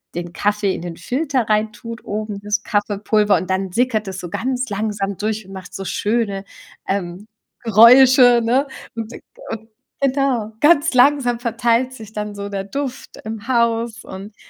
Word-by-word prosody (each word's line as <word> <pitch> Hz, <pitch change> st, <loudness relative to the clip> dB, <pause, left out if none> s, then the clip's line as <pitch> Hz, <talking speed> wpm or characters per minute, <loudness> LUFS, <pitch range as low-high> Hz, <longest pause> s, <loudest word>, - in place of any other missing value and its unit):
den 175 Hz, 0 st, -5 dB
Kaffee 205 Hz, 0 st, 0 dB
in -, -, -6 dB
den 170 Hz, -2 st, -6 dB
Filter 265 Hz, -4 st, -1 dB
rein 215 Hz, 0 st, +1 dB
tut, 230 Hz, +2 st, -9 dB
oben 210 Hz, -1 st, -4 dB
das 210 Hz, +1 st, -1 dB
Kaffeepulver 205 Hz, -1 st, +1 dB
und 185 Hz, +3 st, -5 dB
dann 190 Hz, 0 st, -1 dB
sickert 225 Hz, 0 st, 0 dB
es 190 Hz, -1 st, -5 dB
so 175 Hz, -, -7 dB
ganz 255 Hz, +6 st, -2 dB
langsam 200 Hz, -1 st, -2 dB
durch 215 Hz, -1 st, -3 dB
und -, -, -13 dB
macht 190 Hz, -1 st, -10 dB
so 195 Hz, -, -5 dB
schöne, 205 Hz, -1 st, -1 dB, 0.4 s
ähm, 190 Hz, 0 st, -3 dB, 0.4 s
Geräusche, 245 Hz, +2 st, +7 dB
ne? 255 Hz, +5 st, +2 dB, 0.3 s
Und 225 Hz, 0 st, -5 dB, 0.4 s
und 225 Hz, 0 st, -7 dB, 0.3 s
genau. 265 Hz, -5 st, +1 dB
Ganz 300 Hz, 0 st, +4 dB
langsam 250 Hz, -2 st, +4 dB
verteilt 235 Hz, +1 st, +1 dB
sich 220 Hz, -4 st, -11 dB
dann 210 Hz, -1 st, -4 dB
so 200 Hz, 0 st, -5 dB
der 195 Hz, -1 st, -4 dB
Duft 265 Hz, +5 st, -5 dB
im 220 Hz, 0 st, -6 dB
Haus 235 Hz, -2 st, 0 dB
und 195 Hz, +3 st, -9 dB
220 Hz, 160 wpm, -20 LUFS, 200-245 Hz, 0.4 s, Geräusche